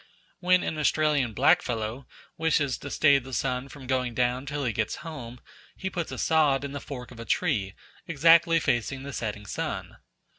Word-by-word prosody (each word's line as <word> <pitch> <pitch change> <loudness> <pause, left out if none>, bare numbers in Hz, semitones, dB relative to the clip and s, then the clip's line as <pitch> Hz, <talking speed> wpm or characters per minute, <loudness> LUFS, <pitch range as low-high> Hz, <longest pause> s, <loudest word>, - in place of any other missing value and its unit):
When 180 0 +3
an 155 - -3
Australian 150 -6 +2
blackfellow 115 +5 +1 0.3
wishes 150 -4 +1
to 145 - -7
stay 145 -1 +4
the 130 0 -11
sun 130 0 -2
from 140 -2 -11
going 125 -2 -1
down 125 +2 0
till 145 0 -3
he 115 - 0
gets 110 +1 -1
home, 125 -7 -7 0.4
he 190 0 -4
puts 170 -2 -3
a - - -5
sod 150 -4 +3
in 140 - -4
the 145 - -5
fork 125 -3 -8
of 120 - -12
a - - -5
tree, 105 - 0 0.3
exactly 165 +2 +5
facing 130 0 -1
the 140 0 -7
setting 105 -3 -4
sun. - - -4
135 Hz, 180 wpm, -27 LUFS, 125-155 Hz, 0.4 s, exactly